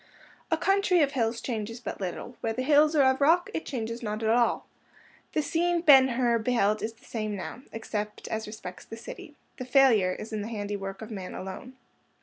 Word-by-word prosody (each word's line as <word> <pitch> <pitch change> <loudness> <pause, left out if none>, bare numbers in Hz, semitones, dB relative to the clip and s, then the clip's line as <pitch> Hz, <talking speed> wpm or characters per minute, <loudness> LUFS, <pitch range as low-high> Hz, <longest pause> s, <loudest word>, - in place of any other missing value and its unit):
A - - +2
country 390 -3 +3
of 280 - +1
hills 230 -3 -1
changes 230 -1 -4
but 225 -3 -6
little; 190 +6 -5
where 225 - -1
the 255 +3 -2
hills 300 +2 +4
are 285 - +5
of 265 +1 +3
rock, 330 +5 +4
it - - -4
changes 230 -2 -4
not 215 -1 -3
at 220 - +1
all. 235 +1 +2 0.7
The 310 - +1
scene 345 +2 +1
Ben 275 -5 +8
Hur 240 -2 +1
beheld 215 -2 +1
is 225 +1 -3
the 225 - -23
same 215 -2 -3
now, 200 +5 -6
except 210 -2 -5
as 220 0 -3
respects 185 -4 -8
the 225 - -9
city. 290 +5 -10 0.2
The 255 - -5
failure 245 -8 +4
is 220 +4 -8
in 215 - -2
the 205 - -4
handiwork 205 -2 -5
of 220 - -9
man 190 -4 -6
alone. 190 +7 -7
230 Hz, 200 wpm, -28 LUFS, 215-270 Hz, 0.7 s, Ben